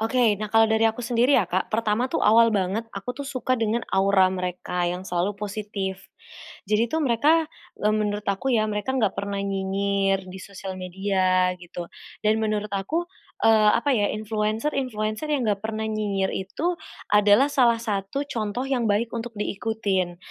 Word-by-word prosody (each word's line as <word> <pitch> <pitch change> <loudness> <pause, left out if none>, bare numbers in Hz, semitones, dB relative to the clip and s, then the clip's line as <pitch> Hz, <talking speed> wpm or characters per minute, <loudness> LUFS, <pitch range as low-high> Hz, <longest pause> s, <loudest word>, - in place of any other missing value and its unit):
Oke. 225 -2 +2
Nah 215 - -3
kalau 225 0 +6
dari 220 +1 +2
aku 230 +2 -4
sendiri 245 +3 +3
ya, 220 - +3
Kak. 185 +2 -1
Pertama 225 +3 +1
tuh, - - -1
awal 230 +1 +6
banget 200 +4 -1
aku 200 +6 -4
tuh 280 +2 -7
suka 255 -2 -1
dengan 225 +1 0
aura 190 -1 +4
mereka 180 -1 -2
yang 180 +1 -4
selalu 190 +2 -1
positif. 200 -2 -5 0.6
Jadi 215 +3 +2
tuh 320 - +1
mereka, 295 +7 +3 0.4
eee, 210 +1 +2
menurut 210 -1 -1
aku 200 +7 0
ya, 215 -2 +3
mereka 210 +5 -2
enggak 215 -7 +2
pernah 200 0 -2
nyinyir 195 0 0
di 185 +1 -8
social 190 -1 -7
media 185 0 +1
gitu, 175 0 -7 0.4
dan 215 +1 +3
menurut 215 -1 -1
aku, 300 - -1 0.4
eee, 220 -1 +6
apa 285 +5 0
ya, 205 -3 +2
influenser-influenser 215 +3 -2
yang 275 -4 +1
enggak 200 -1 0
pernah 220 0 -2
nyinyir 205 -3 -1
itu 285 - -2 0.4
adalah 210 +6 +5
salah 235 -4 +3
satu 210 +4 -2
contoh 220 +1 -3
yang 245 -4 0
baik 220 +3 +1
untuk 235 0 -5
diikutin, 200 -4 -1
210 Hz, 165 wpm, -24 LUFS, 195-230 Hz, 0.6 s, kalau